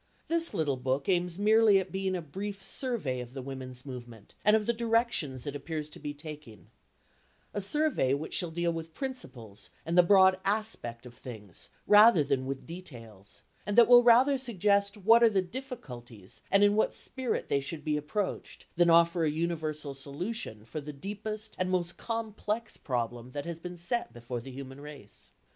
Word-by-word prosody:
This 335 0 +1
little 145 -4 0
book 130 +2 -1
aims 180 -2 +1
merely 215 0 +5
at 190 - -2
being 190 -1 -1
a 175 - -4
brief 195 +6 -6
survey 215 - -1
of 125 0 -8
the 135 - -5
women's 130 -1 -7
movement 120 -5 -10
and 210 +1 +5
of 215 -1 +1
the 235 - +2
directions 230 - 0
it 145 -1 -4
appears 155 +1 -5
to - - -10
be 145 - -4
taking; 145 - -11 0.8
a 205 - -2
survey 255 - +1
which 150 +3 -6
shall 175 - 0
deal 170 +1 -1
with 165 0 -7
principles 130 - -6 0.2
and 165 +2 -1
the 180 - +9
broad 190 +1 +5
aspect 195 - -2
of 125 - -11
things 105 -7 -8 0.2
rather 210 -5 +7
than 135 -2 -1
with 135 0 -5
details, 115 - -10 0.2
and 205 +1 -3
that 235 - +8
will 245 0 +9
rather 250 +3 +5
suggest 200 -4 +1
what 225 +4 +5
are 230 - +7
the 200 -3 +1
difficulties 140 - -9
and 200 +1 +4
in 205 0 +5
what 220 - +1
spirit 260 -2 -2
they 140 - +1
should 150 +2 -6
be 150 -1 +1
approached, 155 +7 -4
than 175 0 +4
offer 170 +1 +5
a 155 - +2
universal 155 -2 -2
solution 140 - -5
for 155 +6 -6
the 150 +1 -7
deepest 215 +7 -6
and 185 0 0
most 175 -2 -1
complex 225 -1 -3
problem 120 -2 -3
that 145 -1 -4
has 170 -1 -5
been 180 +1 -8
set 175 +8 -2
before 120 0 -6
the 135 - -10
human 135 +1 -9
race. 145 -8 -12
170 Hz, 180 wpm, -30 LUFS, 135-210 Hz, 0.8 s, the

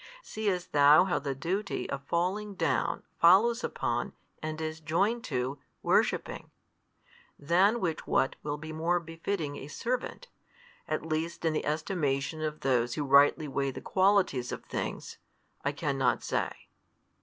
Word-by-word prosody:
Seest 200 - -2
thou 145 +2 +7
how 185 -1 0
the 140 -1 -3
duty 185 +9 -2
of 140 0 -5
falling 195 +6 -1
down 165 -3 0 0.2
follows 220 +8 +5
upon, - - -2 0.3
and 155 0 -4
is 160 0 -4
joined 195 +9 0
to, 130 0 -2 0.2
worshipping? - - +1 0.9
than 185 +10 +3
which 165 -6 -2
what 135 - +2
will 145 0 -3
be 155 +1 -8
more 170 +3 +1
befitting 165 -2 -4
a - - -7
|218 - - -11
servant, 255 - -3 0.6
at 155 0 -2
least 165 +1 -3
in 160 - +2
the 155 - -2
estimation 155 -2 -1
of 155 -1 -3
those 120 -3 +1
who 150 - -1
rightly 145 +2 +5
weigh 140 0 -1
the 130 - -6
qualities 185 -10 +2
of - - -6
things, - - -5 0.4
I 140 - +1
cannot 135 -5 0
say. - - -3
155 Hz, 145 wpm, -29 LUFS, 145-185 Hz, 0.9 s, thou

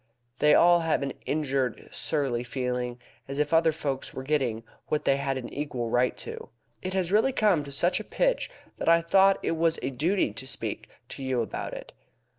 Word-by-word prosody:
They 150 0 +6
all 175 0 +6
have 165 -3 0
an 135 - -3
injured, 135 -5 -1
surly 135 -6 0
feeling 125 -1 -3 0.3
as 135 +1 -5
if 150 +1 0
other 165 0 +5
folk 140 -4 -3
were 130 - -5
getting 130 -6 0 0.2
what 150 0 -1
they 135 - +3
had 140 -1 -1
an 125 - -7
equal 130 -6 -3
right 125 +1 +2
to. - - -6 0.3
It 185 +1 -4
has 185 -2 0
really 220 +6 +4
come 205 - +2
to 140 - -8
such 175 +7 +2
a - - -5
pitch - - 0 0.3
that - - +1
I 170 0 +6
thought 195 +3 +4
it - - 0
was 165 0 +2
a 135 - -1
duty 155 - +1
to 130 +4 -7
speak - - -4 0.2
to 135 - -7
you 130 -3 0
about - - -5
it. - - -9
145 Hz, 200 wpm, -27 LUFS, 130-170 Hz, 0.3 s, They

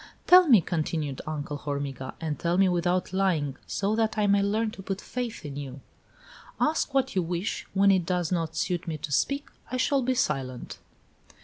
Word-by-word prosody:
"Tell 360 -1 +8
me," 230 -9 +7
continued 155 -4 -2
Uncle 150 -1 -4
Hormiga, 140 -3 -4
"and 155 -3 -3
tell 170 +1 0
me 195 0 +5
without 180 +1 0
lying, 170 -8 +1
so 205 +2 0
that 220 0 0
I 210 - +2
may 200 0 +4
learn 215 +2 0
to 195 - -10
put 195 0 -4
faith 245 -7 -5
in 140 -2 -6
you 135 -2 -6 0.5
" - - -22 0.3
"Ask 305 -2 +1
what 265 -4 +1
you 185 - +3
wish; 175 +3 -3
when 200 +1 +5
it 185 -2 +3
does 180 -2 0
not 165 -3 -1
suit 180 -1 -1
me 160 -2 -2
to 145 - -6
speak 280 - 0 0.2
I 255 - -1
shall 275 +2 +2
be 255 +1 0
silent." 135 - -2
180 Hz, 195 wpm, -27 LUFS, 150-215 Hz, 0.5 s, Tell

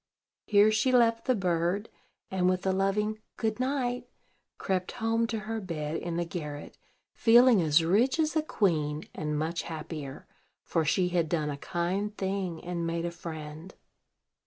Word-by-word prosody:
Here 210 +1 +5
she 220 +4 +2
left 230 -2 +3
the 255 - +3
bird, 180 +2 0 0.4
and, 185 -1 +2
with 185 0 -1
a 190 - +3
loving 205 +3 0 0.2
"Good 220 +1 -1
night," 255 -2 -1 0.5
crept 185 -1 -2
home 230 0 0
to 225 -1 -3
her 220 +1 -4
bed 155 -4 -4
in 170 -1 -4
the 175 - 0
garret, 150 -4 -6 0.4
feeling 240 -2 +6
as 160 0 +4
rich 230 - +3
as 315 0 +1
a 315 - +3
queen, 155 - 0
and 150 -1 -2
much 160 +3 -1
happier; 155 -3 -7 0.4
for 165 - 0
she 180 +4 +2
had 170 -3 0
done 150 -3 0
a - - -3
kind 190 +7 -2
thing, 190 -3 -2
and 170 -1 -3
made 165 0 -2
a 170 - -2
friend. 160 0 -8
185 Hz, 160 wpm, -29 LUFS, 165-220 Hz, 0.5 s, feeling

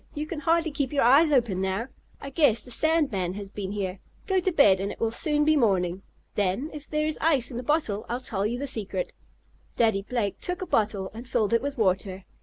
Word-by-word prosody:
"You 300 +1 -2
can 315 0 -5
hardly 330 +1 +1
keep 280 -2 -2
your 290 - +2
eyes 285 +6 +6
open 230 -9 +2
now. 190 +5 -1 0.3
I 275 - -8
guess 270 -6 +3
the 250 - -10
sand 315 +3 +2
man 185 -2 -2
has 200 -1 -7
been 200 -3 -5
here. 195 -2 -3 0.3
Go 385 -1 +2
to 370 +1 0
bed, 205 - +5
and 195 +1 -2
it - - -10
will 225 -1 0
soon 295 +4 +1
be 310 0 +4
morning. 190 - +1 0.3
Then, 205 +9 -1
if 300 -1 -9
there 305 0 0
is 310 -1 -2
ice 285 -6 +2
in 235 - -5
the - - -2
bottle, 250 -7 0
I'll 240 +1 -1
tell 205 -6 -3
you 225 +4 -1
the 280 - -3
secret." 255 - -3 0.6
Daddy 220 -4 +2
Blake 210 -2 -2
took 360 +1 -3
a - - -4
bottle, 205 - 0
and 235 +2 -9
filled 215 0 +1
it 230 - +3
with 285 0 -4
water. 190 -2 0
235 Hz, 230 wpm, -26 LUFS, 200-295 Hz, 0.6 s, eyes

